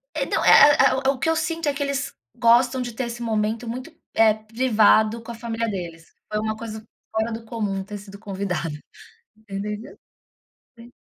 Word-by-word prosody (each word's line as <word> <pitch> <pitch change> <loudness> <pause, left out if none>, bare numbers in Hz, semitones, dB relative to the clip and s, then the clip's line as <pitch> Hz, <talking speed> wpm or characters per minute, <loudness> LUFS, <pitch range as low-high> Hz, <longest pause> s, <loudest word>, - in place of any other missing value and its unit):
É, - - 0
não, - - 0
eh 295 - +8
eh - - +7 0.2
eh, - - +6
o 275 - +1
que 275 - -2
eu 325 - +2
sinto 320 0 -2
é 285 - +2
que 285 - -6
eles 280 0 -2 0.2
gostam 245 +2 +4
de 240 -2 -4
ter 255 +2 -3
esse 235 0 -6
momento 220 +1 -1
muito, 255 +7 -6 0.2
eh, 220 -1 +5
privado 220 0 +2
com 235 - -8
a - - -7
família 230 0 -3
deles. 170 -5 -6 0.2
Foi 210 - 0
uma 215 0 -2
coisa 220 -1 -7 0.3
fora 220 +1 -1
do 225 +1 -5
comum 205 -4 -3
ter 205 +1 -7
sido 200 0 -12
convidada. 195 -5 -3 0.7
Você 215 -2 -15
entendeu? 210 +5 -6 0.8
Sim. 235 +1 -13
225 Hz, 195 wpm, -23 LUFS, 210-245 Hz, 0.8 s, eh